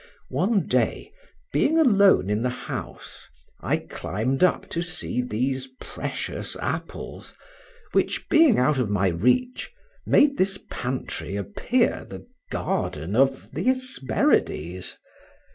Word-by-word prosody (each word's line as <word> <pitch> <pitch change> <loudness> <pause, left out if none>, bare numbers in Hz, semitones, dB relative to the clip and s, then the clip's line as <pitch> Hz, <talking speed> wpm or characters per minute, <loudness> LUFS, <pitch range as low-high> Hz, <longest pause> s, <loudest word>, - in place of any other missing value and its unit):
One 195 -1 +1
day, - - 0 0.4
being 315 +3 +3
alone 200 - +5
in 105 +1 +1
the 125 - +1
house, 125 - -7 0.3
I - - 0
climbed 125 - -2
up 180 - +2
to 170 - -2
see 175 -7 -2
these 130 +3 -2
precious - - -5
apples, - - -5 0.6
which - - 0
being 315 -7 +5
out 130 +2 +3
of 120 -5 0
my 100 -2 +2
reach, 125 - +1 0.4
made 285 -1 +4
this 195 +1 +1
pantry 125 -5 -4
appear 100 -3 0
the - - -9 0.3
garden 80 +7 -2
of 135 +1 +2
Hesperides. 135 - 0
135 Hz, 110 wpm, -25 LUFS, -, 0.6 s, alone